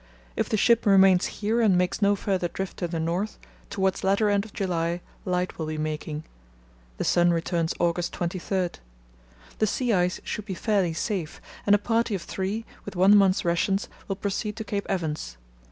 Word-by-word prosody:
If - - -1
the 215 - +1
ship 230 +1 +3
remains 190 -2 +6
here 220 +3 -1
and 200 -5 +4
makes 180 +3 0
no 205 0 +4
further 190 -3 -1
drift 190 +2 -5
to 175 - -2
the 165 -1 -3
north, 175 +6 -2 0.3
towards 190 0 0
latter 200 +2 +3
end 200 0 +1
of 220 - -12
July 175 -3 -1 0.3
light 180 -1 -1
will 160 - -2
be 155 0 -3
making. 155 0 -3 0.7
The - - -2
sun 175 0 +4
returns 170 -1 0
August 175 0 0
23. 180 +1 -1 0.9
The 215 - +3
sea 245 +2 0
ice 180 -1 +1
should 210 - -4
be 195 -3 -4
fairly 195 -4 +1
safe, 180 -2 -3 0.3
and 205 - +7
a - - +4
party 225 +1 0
of 185 - -5
three, 200 +4 -3 0.2
with 205 - -8
one 190 +3 +6
month's 195 -3 +4
rations, 190 +3 +1 0.2
will 195 - -2
proceed 205 +1 -3
to 220 - -5
Cape 200 -1 -3
Evans. 155 - -3
190 Hz, 185 wpm, -26 LUFS, 175-205 Hz, 0.9 s, and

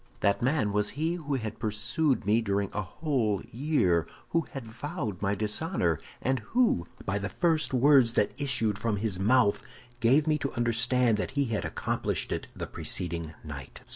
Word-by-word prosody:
"That 100 0 +2
man 125 -5 +1
was 105 0 +2
he 160 +3 +1
who 150 -5 -3
had 110 -4 -4
pursued 115 +5 0
me 110 +3 +3
during 100 -2 -1
a 105 - -1
whole 120 - -1
year, 110 - +1 0.2
who 165 -2 0
had 135 -4 -7
vowed 115 - -5
my 100 0 +1
dishonor, 105 - 0 0.2
and 130 0 +1
who, 225 - +1 0.2
by 100 0 0
the 100 0 -3
first 165 -3 +1
words 130 -2 +5
that 105 - +2
issued 115 -7 0
from 110 -3 0
his 100 -3 -1
mouth, 105 +1 +3 0.4
gave 135 +5 +4
me 155 -1 +1
to 140 - -2
understand 120 -1 +2
he 140 +5 0
had 115 -3 -2
accomplished - - -2
it - - -3
the - - -4
preceding 85 -3 -2
night." 70 -4 -8
115 Hz, 170 wpm, -28 LUFS, 100-140 Hz, 0.4 s, words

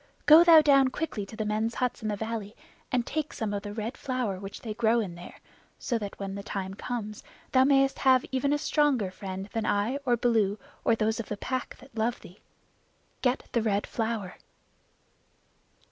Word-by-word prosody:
"Go 315 +3 +9
thou 330 -2 +8
down 275 -3 +5
quickly 255 -7 -4
to 220 - -10
the 215 - -3
men's 220 +2 -1
huts 250 -1 -1
in 215 - -3
the 210 - -1
valley, 220 0 -5 0.4
and 245 -3 +1
take 310 -1 -3
some 215 -2 -3
of 200 - -2
the 205 0 -6
Red 220 +3 -4
Flower 250 -8 -2
which 195 0 -8
they 220 -3 -5
grow 225 -1 +2
there, 175 0 -10 0.4
so 235 -3 -2
that 205 -2 -6
when 195 -1 -4
the 200 - -5
time 195 -1 -4
comes 215 -1 -5 0.3
thou 260 0 +5
mayest 275 -1 +3
have 260 -2 +4
even 265 +2 +1
a 295 - +3
stronger 285 -10 +1
friend 190 0 -6
than 225 -1 -1
I 210 +7 +1
or 255 -4 0
Baloo 220 -4 +2 0.3
or 230 - +3
those 220 +1 0
of 230 - -5
the 210 - -3
Pack 255 +4 -3
that 265 +1 -17
love 225 +2 0
thee. 180 +4 -14 0.8
Get 255 +1 0
the 235 - +1
Red 205 -2 0
Flower." 220 -5 -3
225 Hz, 190 wpm, -28 LUFS, 205-260 Hz, 0.8 s, Go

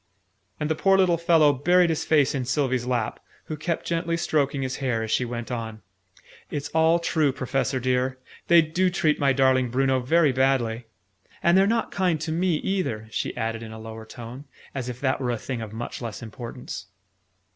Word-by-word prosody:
And 150 - -1
the 160 - +1
poor 195 +5 +3
little 180 -3 +3
fellow 165 -3 +5
buried 175 +5 +3
his 160 - -1
face 150 -4 +3
in 130 -3 -2
Sylvie's 130 -2 0
lap, 120 -3 -1 0.3
who 155 - -4
kept 160 +2 -3
gently 165 0 -1
stroking 140 -5 0
his 130 0 -3
hair 125 -5 -1
as 110 - -4
she 125 - +2
went 120 -1 -5
on. 110 -2 -5 0.7
"It's 145 -1 -4
all 160 +1 +4
true, 160 -4 +1
Professor 135 0 -1
dear! 130 +1 0 0.3
They 170 -1 +7
do 175 +4 +1
treat 155 -4 +1
my 140 -1 +3
darling 130 -2 +3
Bruno 130 +1 +2
very 150 +4 +3
badly! 125 -3 +1 0.6
And 170 - +5
they're 195 +1 +5
not 230 +1 0
kind 180 -5 +1
to 160 - -3
me 175 +1 +1
either," 150 - -2
she - - -3
added 115 0 -2
in 110 -1 -8
a 110 - -8
lower 110 0 -9
tone, 120 +5 -9 0.3
as 130 -2 -4
if 125 0 -6
that 130 -1 0
were 125 - -1
a 120 - 0
thing 120 +1 -5
of 110 -2 -6
much 115 +3 -6
less 115 0 -6
importance. 120 0 -7
135 Hz, 195 wpm, -25 LUFS, 120-160 Hz, 0.7 s, They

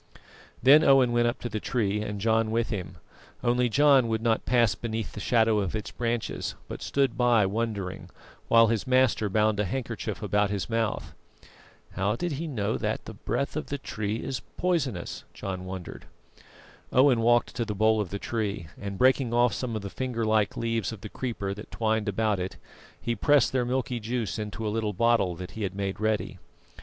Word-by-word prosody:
Then 145 +5 +8
Owen 135 -4 +5
went 120 0 +3
up 120 - -1
to - - -3
the 110 -2 -3
tree 105 -3 -1
and 105 -1 -4
John 110 +1 +2
with 115 +1 0
him, 90 -5 -5 0.5
only 125 0 +2
John 140 -1 +5
would 110 0 -1
not 115 -1 +1
pass 120 -3 +4
beneath 115 -2 -4
the - - -8
shadow 110 0 +3
of 100 0 -2
its 105 - -4
branches; 120 -1 -2
but - - -7
stood 140 -1 +1
by 120 -4 +4
wondering, 100 -2 -3 0.4
while 115 0 +6
his 115 +2 -1
master 130 -5 +3
bound 105 +1 +2
a - - +3
handkerchief 115 +1 -4
about 105 0 +2
his 100 -2 -2
mouth. 115 -1 -2 0.8
"How 100 +3 0
did 175 +7 -2
he 155 +4 -3
know 110 -9 -1
that - - -2
the - - -7
breath 140 - -3
of 155 - -3
the 145 - -3
tree 105 -5 -3
is 130 +3 -3 0.2
poisonous?" 145 - -1
John 95 -1 -5
wondered. 95 -1 -7 0.9
Owen 130 -2 +5
walked 120 +1 +3
to 120 - 0
the 105 -2 -4
bole 110 +1 +3
of 100 - -4
the 100 - -4
tree, 100 -7 -3
and 100 -1 -5
breaking 130 -1 +3
off 120 0 +4
some 120 -3 -3
of 110 - -4
the 100 - -6
finger 125 -3 -2
like 110 -2 +1
leaves 115 -4 -1
of 110 -4 -9
the 105 - -7
creeper 105 -6 -3
that 105 +2 -10
twined 110 -1 0
about 105 0 0
it, 90 +1 -4 0.4
he 120 - -2
pressed 145 +4 +4
their 130 -2 +1
milky 125 -1 -1
juice 110 -4 -3
into 105 +1 -4
a 105 - -1
little 110 -2 -1
bottle 115 -4 +2
that 90 +1 -8
he 110 - -8
had 95 -2 -2
made 100 -1 -3
ready. 110 -1 -1
110 Hz, 195 wpm, -27 LUFS, 105-120 Hz, 0.9 s, Then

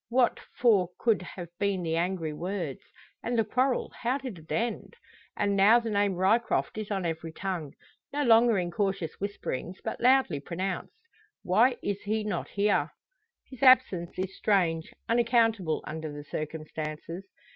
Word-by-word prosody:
What 245 0 +2 0.2
for 205 -8 +4
could 225 -5 +2
have 175 -1 -8
been 200 -3 0
the 165 -1 -1
angry 170 -2 -1
words? 175 -3 -4 0.4
And 240 0 -1
the 225 - +4
quarrel; 255 +4 0
how 250 +3 +1
did 255 -10 -7
it 160 - -15
end? 235 - -2 0.4
And 200 -1 +1
now 205 +5 +6
the 230 -2 -4
name 200 -2 +2
Ryecroft 205 +6 +1
is 215 - -5
on 195 -3 -1
every 165 0 -3
tongue, 175 -5 -4 0.4
no 290 +1 0
longer 230 -2 +5
in 175 -2 -1
cautious 195 -4 -2
whisperings, 190 -3 -4
but 220 - -4
loudly 255 - +4
pronounced. 185 - -4 0.5
Why 235 +8 +4
is 200 0 -2
he 215 +1 -1
not 205 -5 -3
here? 205 0 +1 0.6
His 260 - -13
absence 255 -10 +4
is 190 +1 -3
strange, 170 -6 +1 0.2
unaccountable, 230 -7 +2
under 155 -1 -5
the 145 0 -8
circumstances. 155 +3 -5
195 Hz, 155 wpm, -28 LUFS, 170-230 Hz, 0.6 s, now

